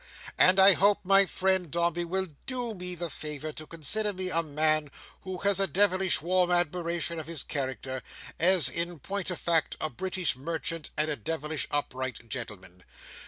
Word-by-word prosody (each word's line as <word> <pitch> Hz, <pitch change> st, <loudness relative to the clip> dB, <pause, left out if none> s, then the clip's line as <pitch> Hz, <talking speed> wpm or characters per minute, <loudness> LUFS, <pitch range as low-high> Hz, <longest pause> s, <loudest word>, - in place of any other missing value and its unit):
And 185 Hz, +1 st, +6 dB
I 190 Hz, +1 st, +9 dB
hope 200 Hz, 0 st, +2 dB
my 195 Hz, +1 st, +5 dB
friend 190 Hz, -2 st, 0 dB
Dombey 170 Hz, +1 st, 0 dB
will 190 Hz, +2 st, -3 dB, 0.2 s
do 245 Hz, -3 st, -3 dB
me 180 Hz, -2 st, -1 dB
the 175 Hz, 0 st, -4 dB
favour 150 Hz, 0 st, -6 dB
to 155 Hz, 0 st, -9 dB
consider 205 Hz, +7 st, 0 dB
me 185 Hz, 0 st, -2 dB
a 165 Hz, -, +3 dB
man 155 Hz, -1 st, +1 dB, 0.3 s
who 185 Hz, -1 st, -6 dB
has 200 Hz, -1 st, +3 dB
a 195 Hz, -, +3 dB
devilish 185 Hz, -2 st, +3 dB
warm 180 Hz, +1 st, +2 dB
admiration 175 Hz, -1 st, 0 dB
of 155 Hz, -, -7 dB
his 165 Hz, -3 st, -2 dB
character, 130 Hz, -1 st, -4 dB, 0.4 s
as, 175 Hz, -4 st, +5 dB
in 170 Hz, +5 st, 0 dB
point 195 Hz, +6 st, -4 dB
of 180 Hz, -, -4 dB
fact, 165 Hz, -2 st, 0 dB
a 155 Hz, -, -2 dB
British 185 Hz, +2 st, -2 dB
merchant 165 Hz, +3 st, -4 dB
and 150 Hz, +1 st, +3 dB
a -, -, -1 dB
devilish 150 Hz, +4 st, -4 dB
upright 130 Hz, -4 st, -3 dB
gentleman. 95 Hz, -8 st, -7 dB
170 Hz, 170 wpm, -28 LUFS, 150-185 Hz, 0.4 s, I